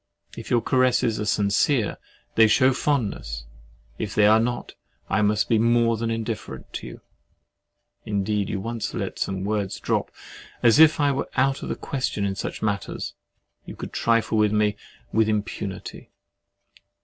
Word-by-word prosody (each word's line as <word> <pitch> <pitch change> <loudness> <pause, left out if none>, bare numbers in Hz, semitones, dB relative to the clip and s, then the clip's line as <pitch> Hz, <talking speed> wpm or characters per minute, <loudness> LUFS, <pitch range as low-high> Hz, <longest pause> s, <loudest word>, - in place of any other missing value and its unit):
If - - -8
your 120 - +3
caresses 125 -3 +2
are 105 - -2
sincere, 105 +4 +1 0.4
they 110 0 +6
shew 130 +5 +4
fondness—if - - -4
they 105 - +5
are 110 +1 +6
not, 120 +2 -2 0.4
I 110 - +2
must 105 0 +2
be 115 - +3
more 115 0 +3
than 115 +1 -2
indifferent 115 -1 -5
to - - -5
you. - - -10 1.0
Indeed 105 0 -1
you 100 - -2
once 115 +3 -4
let - - -4
some 95 -1 -2
words 100 -1 -2
drop, - - -1 0.5
as 120 +4 +6
if 160 0 +7
I 145 -1 +3
were 135 - -2
out 135 +1 +2
of - - -5
the - - -1
question 130 -7 -2
in 100 - -1
such 95 - -5
matters, 100 -2 -2 0.5
and - - -13
you - - -8
could - - -8
trifle 115 -1 +1
with 105 -1 +3
me 105 -1 +2 0.4
with 110 0 +3
impunity. 105 -2 -4
110 Hz, 160 wpm, -24 LUFS, 100-120 Hz, 1.0 s, if